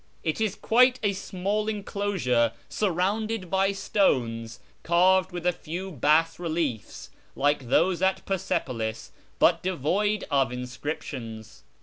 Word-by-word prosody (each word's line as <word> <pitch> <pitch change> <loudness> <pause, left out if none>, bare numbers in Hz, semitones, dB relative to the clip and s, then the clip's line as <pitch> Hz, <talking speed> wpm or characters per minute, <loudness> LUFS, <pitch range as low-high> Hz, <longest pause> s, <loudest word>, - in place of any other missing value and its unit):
It 160 +5 -1
is 215 -3 0
quite 250 +2 +4
a 205 -1 +2
small 200 +3 -2
enclosure 195 - 0
surrounded 200 +1 -1
by 195 +1 +2
stones, 115 - 0 0.2
carved 185 +2 +3
with 175 -1 -6
a 180 - +4
few 175 +4 -6
bas 160 +3 +2
reliel's 160 - -3 0.2
like 145 -3 0
those 180 +6 +3
at 190 0 +1
Persepolis, 120 - -2 0.3
but 170 -1 +4
devoid 190 +5 0
of 135 -4 +2
inscriptions. 125 -3 -6
175 Hz, 115 wpm, -26 LUFS, 135-195 Hz, 0.3 s, quite